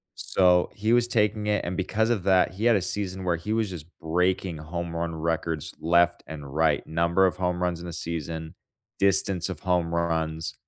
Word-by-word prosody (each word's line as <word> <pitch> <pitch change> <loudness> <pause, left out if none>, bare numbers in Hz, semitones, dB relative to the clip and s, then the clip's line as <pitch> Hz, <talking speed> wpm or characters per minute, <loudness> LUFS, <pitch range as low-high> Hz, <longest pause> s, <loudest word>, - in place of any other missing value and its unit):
So, 90 -1 +3
he 110 +3 0
was 120 0 +4
taking 105 -2 +1
it, 105 0 +1
and 90 - -3
because 110 +4 0
of 105 -7 0
that, 95 -2 +4
he 105 +5 -2
had 120 -2 +6
a 95 - 0
season 95 0 -3
where 90 -2 +1
he 85 +6 -4
was 110 -3 0
just 85 -5 -7
breaking 90 +1 0
home 85 +2 -5
run 85 0 -2
records 80 -1 -2
left 85 +1 +3
and 75 -3 -8
right, 80 -2 +2
number 85 +3 +2
of 90 - -1
home 90 -1 -1
runs 90 -1 -1
in 85 - -7
a - - -5
season, 80 -1 -5 0.4
distance 95 -2 +2
of 95 -5 -6
home 90 -2 0
runs. 80 -1 -1
90 Hz, 195 wpm, -26 LUFS, 80-95 Hz, 0.4 s, had